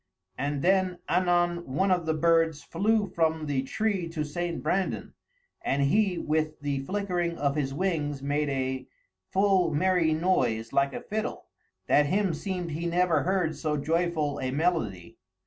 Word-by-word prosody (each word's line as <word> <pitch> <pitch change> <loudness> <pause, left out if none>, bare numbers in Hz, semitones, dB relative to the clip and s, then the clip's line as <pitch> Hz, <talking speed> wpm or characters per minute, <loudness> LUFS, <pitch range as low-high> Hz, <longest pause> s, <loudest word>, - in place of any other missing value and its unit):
And 140 +2 -2
then 185 0 +2
anon 175 -1 +2 0.2
one 190 +4 +2
of 175 -3 +1
the 160 - +2
birds 165 -2 +2
flew 210 +4 +1
from 160 -3 0
the 140 -3 0
tree 190 +4 -1
to 160 -2 -3
St. 170 +2 -3
Brandan, 185 +5 -1 0.5
and 140 +1 0
he 190 +5 +2
with 155 0 -1
the 145 -1 -1
flickering 175 +1 -2
of 140 0 0
his 140 -3 -1
wings 150 -3 -1
made 145 +1 0
a 130 -1 -2 0.4
full 190 -3 +3
merrie 165 0 +2
noise 125 -10 0
like 140 0 +2
a - - -4
fiddle, 215 +1 -4 0.4
that 145 0 +4
him 195 +2 +1
seemed 180 0 -4
he 165 +3 -3
never 170 -3 +2
heard 180 -2 0
so 150 0 -1
joyful 160 -1 0
a 130 - -2
melodie. 130 - -1
165 Hz, 155 wpm, -28 LUFS, 145-180 Hz, 0.5 s, that